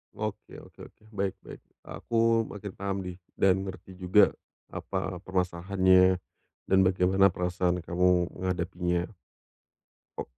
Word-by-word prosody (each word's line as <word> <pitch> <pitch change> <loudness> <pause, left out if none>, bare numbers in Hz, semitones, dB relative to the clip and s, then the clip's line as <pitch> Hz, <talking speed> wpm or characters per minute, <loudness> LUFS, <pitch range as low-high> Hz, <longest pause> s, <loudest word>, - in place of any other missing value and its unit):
Oke - - -6
oke - - -15
oke. - - -31
Baik 100 -1 -2
baik. - - -10 0.2
Aku 115 0 +1
makin 100 -1 -8
paham 100 0 -3
nih, 90 -1 -7 0.2
dan 95 0 +3
ngerti 95 0 -8
juga, 95 +2 +4 0.4
apa 90 -2 -4
permasalahannya, 95 0 +2 0.5
dan 95 - +2
bagaimana 95 +1 +4
perasaan 90 0 -1
kamu 90 +1 +2
menghadapinya. 90 -1 -2 1.1
O - - -2
95 Hz, 115 wpm, -28 LUFS, 90-95 Hz, 1.1 s, juga